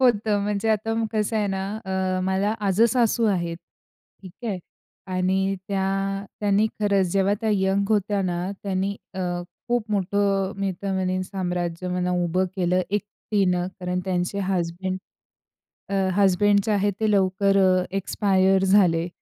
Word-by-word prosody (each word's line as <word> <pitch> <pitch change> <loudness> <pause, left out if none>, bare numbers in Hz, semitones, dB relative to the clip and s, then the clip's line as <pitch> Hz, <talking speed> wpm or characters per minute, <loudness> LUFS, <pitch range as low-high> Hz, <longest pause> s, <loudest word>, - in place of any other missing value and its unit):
होतं, 215 -5 +3
म्हणजे 210 +2 -1
आता 220 +1 +1 0.2
कसं 215 +1 0
आहे 210 -1 +1
ना. 190 -1 -2 0.2
अ, 190 -1 -1
मला 195 +3 +1
आजेसासू 230 +3 +3
आहेत 170 -4 0 0.7
ठीक 190 +6 -12
आहे 190 -3 -2 0.6
आणि 190 +1 +1
त्या 195 0 -1 0.2
त्यांनी 205 +1 +3
खरंच, 200 -2 +2
जेव्हा 195 +1 +2
त्या 220 - 0
यंग 195 0 +1
होत्या 205 -1 +1
ना 175 -1 -1 0.2
त्यांनी 195 0 -1 0.2
अ, 190 - -4 0.5
खूप 235 -3 0
मोठं 195 0 +1
मी 195 -1 -1
तर 195 -1 -1
म्हणेन 185 0 0
साम्राज्य 180 -2 -3
म्हणा 180 0 -1
उभं 180 +2 +1
केलं 180 0 +2
एकटीने. 200 -3 0
कारण 180 0 -1
त्यांचे 180 +1 -1
हजबंड 185 0 -2 0.9
अ, 200 - -3 0.2
हजबंड 200 +1 +4
जे 215 - 0
आहे 205 0 +2
ते 220 -1 +2
लवकर 195 0 +2
अ, 185 -1 +3
एक्सपायर 190 -1 +2
झाले. 180 -4 +4
195 Hz, 140 wpm, -24 LUFS, 185-205 Hz, 0.9 s, हजबंड